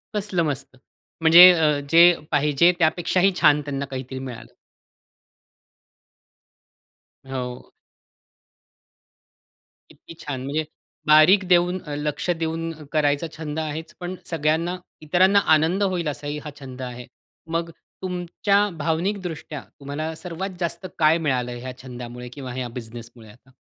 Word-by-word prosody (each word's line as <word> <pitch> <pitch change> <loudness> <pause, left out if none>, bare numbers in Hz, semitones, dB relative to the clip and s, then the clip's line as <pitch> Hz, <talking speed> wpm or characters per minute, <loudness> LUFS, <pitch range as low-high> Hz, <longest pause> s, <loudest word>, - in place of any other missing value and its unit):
कसलं 200 -4 0
मस्त! 135 -4 -4 0.5
म्हणजे 165 +2 +8
अ, 155 -4 +2
जे 165 +2 +7 0.3
पाहिजे 150 +3 +4
त्यापेक्षाही 180 +3 +2
छान 150 -3 +4
त्यांना 140 -1 -3
काहीतरी 130 -1 -6
मिळालं. 125 -4 -9 2.8
हो. 125 -2 -6 2.2
किती - - -14
छान! 140 -3 -4
म्हणजे 145 +4 -1 0.4
बारीक 155 +6 +6
देऊन 180 +1 +3
अ, 150 -2 -6
लक्ष 150 +4 -3
देऊन 165 0 -2 0.2
करायचा 150 +1 +1
छंद 155 -1 -4
आहेच, 160 +1 -5
पण 180 +1 -5
सगळ्यांना 165 +2 0 0.2
इतरांना 185 +6 +4
आनंद 165 +6 +2
होईल 180 -4 -1
असाही 145 0 -4
हा - - -4
छंद 130 -2 -9
आहे. 125 -1 -7 0.4
मग 165 +1 -2 0.3
तुमच्या 185 +3 0
भावनिकदृष्ट्या 165 -1 -3 0.2
तुम्हाला 145 +3 -4
सर्वात 180 +3 -5
जास्त 175 +2 -3
काय 155 +1 +5
मिळालं? 130 -6 -1
ह्या 130 +1 -7
छंदामुळे 125 -1 -8
किंवा 135 -3 -7
ह्या 125 0 -4
बिझनेसमुळे 115 -1 -10
आता? 125 +5 -20
155 Hz, 115 wpm, -23 LUFS, 135-170 Hz, 2.8 s, म्हणजे